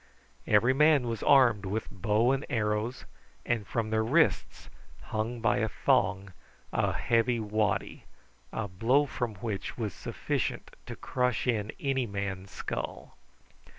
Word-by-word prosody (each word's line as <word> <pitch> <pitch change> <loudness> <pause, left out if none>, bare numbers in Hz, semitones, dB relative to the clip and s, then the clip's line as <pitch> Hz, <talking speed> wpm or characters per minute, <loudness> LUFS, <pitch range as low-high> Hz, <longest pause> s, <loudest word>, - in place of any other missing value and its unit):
Every 115 +5 +4
man 150 -2 +4
was 115 -2 -3
armed 120 -7 +5
with 105 +3 -3
bow 105 +5 +2
and 135 +1 0
arrows, 110 +2 -1 0.4
and 115 -4 -1
from 110 -2 -2
their 110 0 +2
wrists 110 - +1 0.4
hung 110 +8 -3
by 115 - +2
a 110 +1 0
thong 95 -2 +1 0.4
a - - +1
heavy 115 0 +1
waddy, 105 -1 -1 0.5
a 110 - -3
blow 115 +10 +2
from 120 -5 -4
which 105 0 -5
was 110 -6 -3
sufficient - - -3
to - - -6
crush 125 -3 -1
in 110 -4 0
any 135 -3 0
man's 100 -2 -4
skull. - - -5
110 Hz, 135 wpm, -29 LUFS, 105-125 Hz, 0.5 s, armed